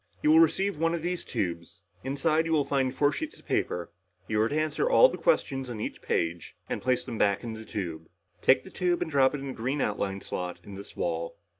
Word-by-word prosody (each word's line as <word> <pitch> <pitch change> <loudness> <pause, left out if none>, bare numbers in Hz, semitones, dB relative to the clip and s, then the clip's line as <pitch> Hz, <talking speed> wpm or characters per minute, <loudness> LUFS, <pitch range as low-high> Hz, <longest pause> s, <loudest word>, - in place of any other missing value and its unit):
"You 150 - +5
will 160 - +7
receive 165 +2 +3
one 165 +1 +2
of 165 - -5
these 180 0 -2
tubes. 85 -2 -4 0.2
Inside, 155 +4 +1
you 165 - 0
will 145 -3 +3
find 135 -2 +1
four 145 +2 +2
sheets 315 - -5
of - - -19
paper. 85 -1 -1 0.4
You 105 -1 +1
are 110 - +2
to 150 - 0
answer 155 - 0
all - - +7
the - - -5
questions 135 - +1
on 115 -3 -5
each - - -5
paper 85 +1 0 0.3
and - - -3
place 125 0 +1
them 115 - -5
back 100 +1 +2
in 115 -1 -4
the 110 0 -8
tube. 85 -7 -5 0.3
Take - - +5
the - - -12
tube 175 -1 +1
and 160 - -7
drop 135 0 +4
it 140 - -5
in 140 - -5
the - - -4
green 130 +6 -2
outline 100 -4 -1
slot 90 -1 -4
in 100 - -10
this 100 +1 -10
wall." 85 -1 -2
130 Hz, 240 wpm, -28 LUFS, 100-160 Hz, 0.4 s, will